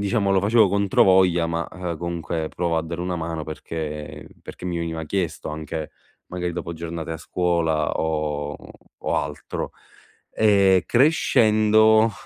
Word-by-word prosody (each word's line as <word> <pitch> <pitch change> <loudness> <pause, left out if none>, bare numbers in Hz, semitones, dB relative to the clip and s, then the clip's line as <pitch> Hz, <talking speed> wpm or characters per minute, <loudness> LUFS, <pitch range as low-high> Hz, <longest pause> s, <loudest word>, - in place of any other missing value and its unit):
diciamo 100 -1 +1
lo 95 -1 +3
facevo 110 +1 +4
controvoglia, 95 -3 +3
ma, 85 0 -2
uhm, 90 -3 -4
comunque 85 -1 -3
provo 85 0 -1
a 80 - +1
dare 85 +1 -5
una 90 0 -2
mano 80 -1 -4
perché 75 -1 -6
perché - - -11
mi 85 -2 -2
veniva 80 -1 -3
chiesto 90 -1 -3
anche, 80 0 -5 0.4
magari 90 -1 -4
dopo 85 -1 -5
giornate 85 0 -6
a 80 - -3
scuola 80 -3 0
o 75 -2 -2 0.4
o - - -2
altro. - - -4 0.6
Ehm, 100 -4 +4
crescendo 110 -5 +4
85 Hz, 135 wpm, -23 LUFS, 80-100 Hz, 0.6 s, facevo